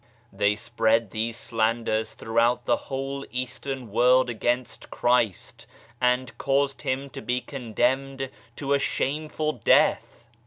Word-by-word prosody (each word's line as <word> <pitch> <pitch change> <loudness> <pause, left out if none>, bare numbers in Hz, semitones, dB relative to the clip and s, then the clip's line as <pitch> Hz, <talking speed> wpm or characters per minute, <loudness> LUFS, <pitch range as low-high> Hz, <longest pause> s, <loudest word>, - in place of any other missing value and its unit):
They 100 +1 +2
spread 115 -1 +1
these 115 +1 -2
slanders 110 -1 0
throughout 115 +2 +1
the - - +3
whole 135 0 -3
Eastern 130 -1 -4
world 125 +3 +4
against 120 +2 -2
Christ, 120 -5 0 0.3
and 125 0 +1
caused 140 0 +1
Him 135 +2 -2
to - - -7
be 125 0 0
condemned 135 +2 -1 0.2
to 140 0 -1
a 140 - +3
shameful 155 +3 -1
death 120 -1 +2
125 Hz, 120 wpm, -26 LUFS, 115-135 Hz, 0.3 s, world